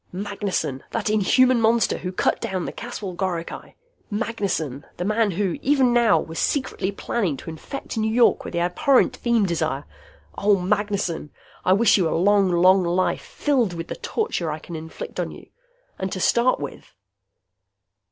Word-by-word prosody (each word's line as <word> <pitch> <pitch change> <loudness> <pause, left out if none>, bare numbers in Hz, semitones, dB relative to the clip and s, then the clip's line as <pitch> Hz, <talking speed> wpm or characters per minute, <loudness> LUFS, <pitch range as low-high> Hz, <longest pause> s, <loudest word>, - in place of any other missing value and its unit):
Magnessen! 195 -8 -3
That 210 - -1
inhuman 240 +4 +4
monster 230 +1 +2
who 180 - -4
cut 185 - 0
down 190 -6 -2
the - - -4
Caswell 215 -5 -6
goricae! 175 -2 -4 0.3
Magnessen! 200 - -2
The 175 - -3
man 215 +1 +2
who, 185 -1 -1
even 265 -3 +3
now, 235 -3 +4
was 165 +1 -5
secretly 260 -8 -1
planning 195 - -2
to 145 - -8
infect 205 - -7
New 220 0 +1
York 235 +1 +4
with - - -7
the 170 - 0
abhorrent 250 +8 +2
feem 235 -3 +2
desire! 160 -6 -1 0.5
Oh, 200 -1 +3
Magnessen, 195 -4 -1 0.3
I 185 - +4
wish 210 +2 +5
you 175 -4 +2
a - - 0
long, 200 +2 +4
long 185 +2 +5
life, 175 +2 0
filled 255 -10 0
with 165 -1 -6
the - - -4
torture 305 - -2
I 150 - -3
can 165 +2 -9
inflict 160 0 -7
on - - -1
you. - - -12 0.5
And 190 0 -3
to 185 - -3
start 240 +6 +3
with.... 145 -2 -8
195 Hz, 165 wpm, -23 LUFS, 170-230 Hz, 0.5 s, wish